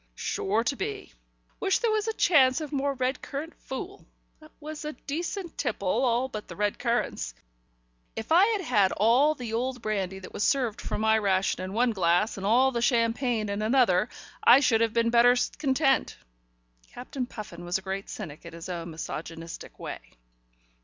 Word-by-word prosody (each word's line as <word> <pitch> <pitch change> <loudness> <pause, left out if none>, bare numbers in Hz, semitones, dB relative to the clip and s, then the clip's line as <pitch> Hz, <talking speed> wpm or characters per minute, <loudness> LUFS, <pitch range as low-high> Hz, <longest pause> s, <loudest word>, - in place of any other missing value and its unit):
"Sure 210 - -1
to 275 - 0
be. 165 - -5 0.5
Wish 385 - +2
there 465 -2 +1
was 430 0 0
a 445 - 0
chance 265 -11 +4
of 305 -2 -6
more 280 -1 0
red 255 +1 -1
currant 300 +4 -6
fool. 365 +10 -7 0.4
That 310 0 -16
was 305 0 -7
a 300 0 -4
decent 345 +5 -5
tipple, 200 - -2
all 240 +4 +2
but 215 -5 -7
the - - -9
red 205 0 -1
currants. 235 - -1 0.8
If 225 +6 -6
I 360 +5 +6
had 435 -3 0
had 210 - +3
all 250 +9 +4
the 240 -5 -6
old 250 +2 -1
brandy 195 -3 -2
that 190 - -11
was - - -2
served 250 -6 +1
for - - -3
my 220 0 +3
ration 190 -2 +1
in 185 +1 -5
one 240 +2 +2
glass, 185 +1 +2
and 195 0 -4
all 255 +5 +4
the 235 -2 -2
champagne 230 -2 +1
in 200 +1 -2
another, 215 -5 +3 0.3
I 245 +3 +8
should 230 -5 +3
have 230 -1 +2
been 230 0 +2
better 240 +1 +6 0.2
content." 270 -1 +1 0.7
Captain 250 +1 -5
Puffin 215 -6 -9
was 175 +1 0
a 190 - -10
great 195 +1 -4
cynic 155 -9 -7
in 170 - -10
his 170 +2 -8
own 170 -1 -4
misogynistic 165 +1 -7
way. - - -6
235 Hz, 180 wpm, -27 LUFS, 200-275 Hz, 0.8 s, I